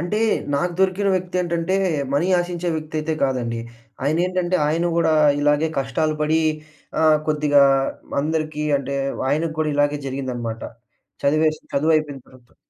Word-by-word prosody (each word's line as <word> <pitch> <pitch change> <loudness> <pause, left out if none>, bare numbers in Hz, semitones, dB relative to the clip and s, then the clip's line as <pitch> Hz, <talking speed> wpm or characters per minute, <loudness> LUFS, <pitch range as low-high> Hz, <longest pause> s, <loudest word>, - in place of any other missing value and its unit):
అంటే 175 +6 -1 0.4
నాకు 175 +5 0
దొరికిన 190 +1 +2
వ్యక్తి 185 0 -2
ఏంటంటే 170 +2 -1 0.4
మనీ 160 +5 +2
ఆశించే 175 0 -3
వ్యక్తి 155 0 -6
అయితే 155 +1 -1
కాదండి. 120 -4 -1 0.4
ఆయనేంటంటే 180 +4 +1
ఆయన 165 +3 +1
గూడా 160 -2 +3 0.3
ఇలాగే 145 +2 +2
కష్టాలు 155 +4 0
పడి 155 +1 +2 0.6
ఆహ్, 155 -1 +5
కొద్దిగా 150 -2 +4 0.6
అందరికి 155 0 -2
అంటే 140 0 -4 0.3
ఆయనకి 155 +2 0
కూడా 155 -1 +1
ఇలాగే 145 0 +1
జరిగిందన్నమాట. 125 -4 -4 0.6
చదివేసి 155 +2 +2
చదువైపోయిన 155 -2 +1
తర్వాత. 125 -2 -21
155 Hz, 130 wpm, -22 LUFS, 140-170 Hz, 0.6 s, ఆహ్